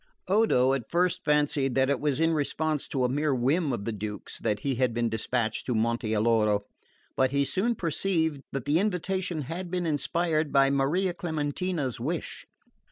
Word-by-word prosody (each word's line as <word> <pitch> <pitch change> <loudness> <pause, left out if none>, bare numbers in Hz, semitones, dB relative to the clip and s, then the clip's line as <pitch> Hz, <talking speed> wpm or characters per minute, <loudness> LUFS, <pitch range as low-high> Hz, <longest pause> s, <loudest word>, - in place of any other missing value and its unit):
Odo 185 - +3
at 135 -4 -3
first 180 +1 +1
fancied 145 -3 +1
that 130 0 +3
it 140 - 0
was 145 -1 0
in 165 0 +3
response 155 0 -1
to 130 -3 -1
a - - +3
mere 145 +2 0
whim 140 +5 +1
of 110 -5 -3
the 115 - -1
Duke's 105 0 -5
that 105 0 -1
he 140 - 0
had 125 -2 0
been 120 -1 +1
despatched 110 +1 -2
to 125 - 0
Monte 115 0 0
Alloro; 105 -2 +2 0.5
but 130 0 +3
he 140 +1 +1
soon 225 - 0
perceived 165 -4 0
that 135 -3 -4
the 150 +3 +3
invitation 185 -3 -1
had 170 +6 -5
been 180 0 -2
inspired 155 0 0
by 135 -1 +4
Maria 160 +7 +1
Clementina's 160 -4 -2
wish. 155 +8 -4
145 Hz, 175 wpm, -27 LUFS, 125-170 Hz, 0.5 s, by